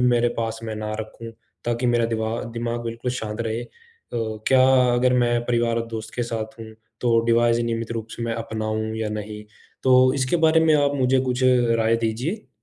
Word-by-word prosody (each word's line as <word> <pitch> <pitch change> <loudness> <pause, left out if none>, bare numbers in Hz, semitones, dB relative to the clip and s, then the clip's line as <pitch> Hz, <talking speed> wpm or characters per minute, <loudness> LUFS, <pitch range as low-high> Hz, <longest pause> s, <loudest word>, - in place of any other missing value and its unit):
मेरे 120 -1 +3
पास 115 -1 -2
में 110 -1 -4
ना 105 0 -4
रखूँ, 115 +1 -8 0.3
ताकि 120 +1 -1
मेरा 120 -1 +2
दिवा 110 0 -2
दिमाग 120 0 -3
बिल्कुल 115 +2 -3
शांत 110 -2 -4
रहे। 115 +1 -2
अ, - - -12 0.8
क्या 130 -1 +5 0.3
अगर 125 +1 +3
मैं 120 -1 +2
परिवार 120 -1 +1
और 115 - -2
दोस्त 110 -1 -7
के 120 - -1
साथ 115 -1 -5
हूँ, 110 - -7 0.3
तो 115 -2 +3
डिवाइस 115 0 +3
नियमित 115 -1 -2
रूप 115 -1 -4
से - - -6
मैं 115 -1 -2
अपनाऊँ 110 -1 -3
या 110 -1 -2
नहीं? 105 0 -6 0.4
तो 130 0 +5
इसके 135 +3 +1
बारे 160 +1 +4
में 160 -1 +4
आप 145 -1 +2
मुझे 130 0 +2
कुछ 125 0 -1
राय 115 -3 +3
दीजिए? 120 - -3
115 Hz, 190 wpm, -23 LUFS, 110-125 Hz, 0.8 s, क्या